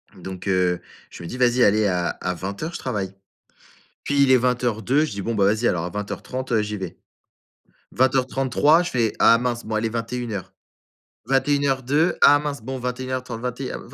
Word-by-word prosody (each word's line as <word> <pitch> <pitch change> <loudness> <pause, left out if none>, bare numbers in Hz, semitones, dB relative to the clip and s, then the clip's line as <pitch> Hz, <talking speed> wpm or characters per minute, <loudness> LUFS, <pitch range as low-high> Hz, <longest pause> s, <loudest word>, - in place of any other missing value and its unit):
Donc, 95 0 -8
heu, 90 -2 +2 0.3
je - - -11
me - - -6
dis: 125 - -6
«Vas-y 125 0 +3
allez 105 +1 +4
à 90 -2 0
à 90 - -3
20:00 100 - -5
je - - -5
travaille». 95 -2 -3 0.9
Puis 140 0 +2
il 135 - +4
est 130 - +7
20:02, 125 +2 +1
je 155 - -4
dis: 100 0 -5
«Bon 115 +4 -2
bah 100 -2 +2
vas-y 110 +4 +2
alors 85 -2 0
à 90 - -4
20:30, 120 +6 -5
heu, 110 - +3
j'y 105 0 -4
vais». 95 -3 -7 0.9
20:33, 135 +4 +3
je 175 - -4
fais: 115 -4 +1
«Ah 115 - +6
mince, 120 -1 -2
bon, 110 - -3
allez 110 +1 0
21:00. 115 -3 -4 0.7
21:02, 140 +3 +1
ah 145 - +8
mince. 145 -4 -4
Bon, 130 +3 -5
21:30, 125 -1 -4
21». 125 +1 -4
120 Hz, 175 wpm, -23 LUFS, 105-130 Hz, 0.9 s, ah